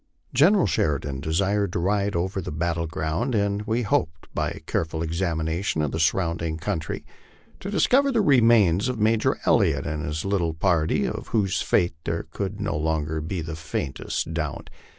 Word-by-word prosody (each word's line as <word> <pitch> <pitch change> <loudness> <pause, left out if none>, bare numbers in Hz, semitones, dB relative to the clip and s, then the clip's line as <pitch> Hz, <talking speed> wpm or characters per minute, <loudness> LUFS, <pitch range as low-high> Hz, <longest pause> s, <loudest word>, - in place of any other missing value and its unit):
General 175 +9 +5
Sheridan 75 -5 0
desired 100 +6 0
to 95 - 0
ride 100 +2 0
over 95 +3 -1
the - - -6
battle 85 +1 -1
ground, 90 - -2
and 100 0 +1
we 115 +2 +1
hoped 80 -5 -1
by - - 0
a - - -7
careful 80 0 -2
examination 80 0 -1
of 75 - -1
the - - -3
surrounding 85 -1 0
country 80 -2 -3 0.5
to 195 - -6
discover 270 +7 +3
the 235 -4 +2
remains 115 - +4
of 125 - -2
Major 110 +4 +2
El - - +5
liott 80 -10 +1
and 75 -2 -3
his 75 +4 -3
little 90 -5 0
party, 80 -2 +1
of - - -5
whose 105 -2 0
fate 85 -2 +2
there - - -1
could 100 +1 -4
no 100 -1 -2
longer 80 0 -1
be 85 +3 -3
the 80 0 -5
faintest 80 0 -3
doubt. 80 -2 -4
85 Hz, 170 wpm, -25 LUFS, 80-105 Hz, 0.5 s, General